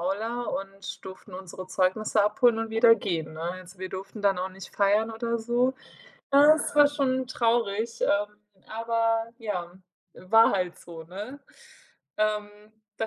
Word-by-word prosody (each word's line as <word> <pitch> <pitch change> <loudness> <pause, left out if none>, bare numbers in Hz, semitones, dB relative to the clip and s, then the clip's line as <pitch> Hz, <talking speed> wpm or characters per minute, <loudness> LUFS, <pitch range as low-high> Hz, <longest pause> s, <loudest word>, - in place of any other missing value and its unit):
Aula 220 +7 -2
und 195 -2 -6
durften 190 +2 -11
unsere 185 0 -8
Zeugnisse 190 +3 +1
abholen 225 +2 +3
und 225 0 -3
wieder 230 +1 +6
gehen, 160 -5 -3
ne? 160 - -8
Also, 185 0 -12
wir 185 - -5
durften 195 +3 -8
dann 195 -2 +3
auch 185 +1 -2
nicht 190 0 -12
feiern 210 +2 +2
oder 235 +1 -2
so. 245 +3 +1 0.6
Ja, 290 +2 +8
es 300 - -3
war 290 -1 +7
schon 260 -3 0
traurig, 230 -2 0
ähm, 210 +1 +1 0.3
aber, 230 0 0
ja, 185 -7 -4 0.4
war 225 +5 +4
halt 180 -3 -1
so, 165 -2 -10
ne? 205 - -8 0.8
Ähm, 210 -1 0 0.5
da 225 - -1
215 Hz, 150 wpm, -27 LUFS, 190-230 Hz, 0.8 s, Ja